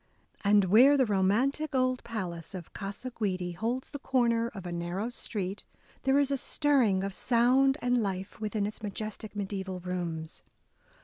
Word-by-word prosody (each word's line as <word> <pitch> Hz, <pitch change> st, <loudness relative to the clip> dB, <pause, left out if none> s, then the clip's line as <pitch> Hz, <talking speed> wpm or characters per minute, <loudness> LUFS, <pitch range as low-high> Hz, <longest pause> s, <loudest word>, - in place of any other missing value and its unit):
And, 200 Hz, -1 st, +5 dB
where 250 Hz, +10 st, +7 dB
the 260 Hz, -, +4 dB
romantic 235 Hz, +10 st, +1 dB
old 255 Hz, -1 st, +1 dB
palace 185 Hz, -6 st, -5 dB
of 175 Hz, -3 st, -8 dB
Gasa 205 Hz, +5 st, -5 dB
Guidi 185 Hz, -5 st, -2 dB
holds 235 Hz, +8 st, -3 dB
the 285 Hz, -, -6 dB
corner 235 Hz, -4 st, +2 dB
of 195 Hz, -6 st, -8 dB
a 175 Hz, -, -4 dB
narrow 175 Hz, +6 st, -3 dB
street, 200 Hz, -5 st, -4 dB, 0.4 s
there 270 Hz, +1 st, +4 dB
is 285 Hz, -1 st, +3 dB
a 275 Hz, -, +2 dB
stirring 255 Hz, -10 st, +2 dB
of 195 Hz, 0 st, -3 dB
sound 255 Hz, +5 st, +3 dB
and 245 Hz, -1 st, +2 dB
life 195 Hz, 0 st, -4 dB
within 210 Hz, -1 st, -1 dB
its 210 Hz, +2 st, -5 dB
majestic 215 Hz, +1 st, -5 dB
mediaeval 190 Hz, -2 st, -4 dB
rooms. 170 Hz, -3 st, -4 dB
210 Hz, 160 wpm, -29 LUFS, 190-250 Hz, 0.4 s, where